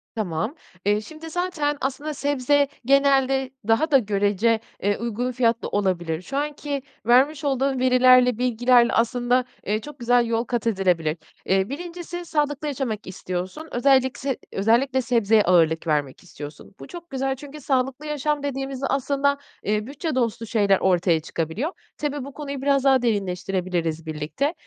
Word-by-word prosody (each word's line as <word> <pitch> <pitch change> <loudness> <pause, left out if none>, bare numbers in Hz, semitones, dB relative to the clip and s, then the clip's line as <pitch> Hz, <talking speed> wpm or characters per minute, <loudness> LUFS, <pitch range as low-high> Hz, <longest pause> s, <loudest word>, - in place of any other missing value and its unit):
Tamam. 210 - -2 0.3
Eee, 205 +1 +2
şimdi 315 +7 -10
zaten 320 -4 -1
aslında 285 +3 -3
sebze 285 0 +1 0.2
genelde 270 -1 +3 0.2
daha 300 +8 +2
da 275 - +8
görece, 210 0 +1 0.2
eee, 205 0 +1
uygun 235 +2 -2
fiyatlı 235 -1 +1
olabilir. 175 -5 -1
Şu 275 +9 -5
anki 290 -1 -3 0.2
vermiş 275 +5 +4
olduğun 270 -1 0
verilerle, 255 -1 +5
bilgilerle 245 0 +3
aslında, 245 +2 +2 0.2
eee, 215 +1 0
çok 290 +2 -11
güzel 240 0 +3
yol 230 0 0
kat 240 -2 -2
edilebilir. 180 -6 +1 0.3
Eee, 190 +1 +1
1'incisi 350 +3 -6
sağlıklı 295 -2 -1
yaşamak 250 -7 -3
istiyorsun, 185 - -5
özellik 260 0 +3
se 270 -2 -2 0.2
özellikle 245 +6 +2
sebzeye 225 -3 +3
ağırlık 165 -2 +3
vermek 145 -3 -1
istiyorsun. 145 +5 -10
Bu - - -9
çok 345 -1 -10
güzel 270 0 -1
çünkü 290 +2 -11
sağlıklı 265 +2 -1
yaşam 300 0 -1
dediğimizde 270 -1 -3
aslında, 280 +1 +1 0.3
eee, 210 0 0
bütçe 295 +1 -4
dostu 230 -2 -1
şeyler 205 -4 +2
ortaya 175 -3 +2
çıkabiliyor. 165 - -3 0.3
Tabii, 290 -2 -3
bu 280 - -9
konuyu 280 -2 -6
biraz 275 -1 +2
daha 265 -2 +4
derinleştirebiliriz 180 -6 -1
birlikte. 155 - -2
250 Hz, 145 wpm, -23 LUFS, 205-280 Hz, 0.3 s, da